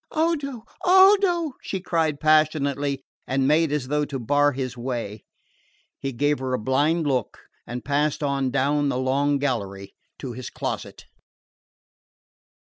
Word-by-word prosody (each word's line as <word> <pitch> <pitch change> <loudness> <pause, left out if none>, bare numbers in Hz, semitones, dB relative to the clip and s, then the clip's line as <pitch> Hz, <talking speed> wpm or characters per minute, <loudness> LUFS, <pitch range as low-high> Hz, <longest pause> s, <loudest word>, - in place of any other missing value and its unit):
"Odo! 290 -7 -1 0.2
Odo!" 375 -4 +5
she 190 - -4
cried 160 -5 0
passionately, 145 -3 +2 0.2
and 130 0 +1
made 155 +1 +3
as 145 -4 -1
though 150 +2 0
to 140 -2 -4
bar 145 +4 +2
his 130 -2 -4
way. 120 -4 -5 0.8
He 135 - -3
gave 145 +3 0
her 130 -1 -3
a - - -1
blind 145 +8 +1
look 130 -5 -1 0.3
and 120 +1 -6
passed 145 +1 0
on 140 -2 0
down 145 +2 +1
the 125 - -1
long 140 +2 +1
gallery 100 -8 -3 0.2
to 130 -4 -6
his 125 +1 -7
closet. - - -5
145 Hz, 140 wpm, -24 LUFS, 130-155 Hz, 0.8 s, Odo